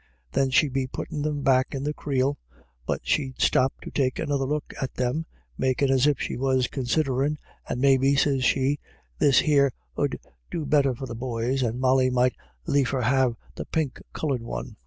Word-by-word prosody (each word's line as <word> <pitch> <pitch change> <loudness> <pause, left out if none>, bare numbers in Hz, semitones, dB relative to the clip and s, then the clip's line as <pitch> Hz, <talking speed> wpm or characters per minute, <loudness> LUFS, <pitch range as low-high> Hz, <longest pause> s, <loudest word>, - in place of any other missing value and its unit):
Then 135 - +2
she'd 140 +1 +3
be 135 -1 0
puttin' 145 +3 -5
them 145 -1 -2
back 130 0 +2
in 135 - -3
the 150 +1 -1
creel, 140 -1 -1 0.5
but - - -1
she'd 130 -4 -1
stop 130 +1 +3
to - - -8
take 130 -3 0
another 140 -2 -1
look 150 +2 -3
at 130 - -3
them, 130 +6 -1 0.3
makiij' 130 +1 +2
as 135 +1 +4
if 145 -3 +2
she - - -3
was 130 -1 +1
considherin', 135 +2 0 0.3
and - - -1
i - - -4
Maybe,' 135 0 +4
sez 140 -2 +2
she, 135 +3 +2 0.2
' - - -36
this 140 -3 +5
here 140 -3 +3 0.2
'ud - - 0 0.3
do 160 -3 -3
better 140 -3 +3
for 135 - -6
the 125 - -6
boys, 120 +2 -2
and 120 0 -1
Molly 130 0 +3
might 125 0 +2 0.3
liefer 135 -2 +1
have 125 0 +2 0.2
the - - -6
pink 155 -5 -2
coloured 140 -6 -2
one.' 115 - -6
135 Hz, 190 wpm, -25 LUFS, 130-145 Hz, 0.5 s, this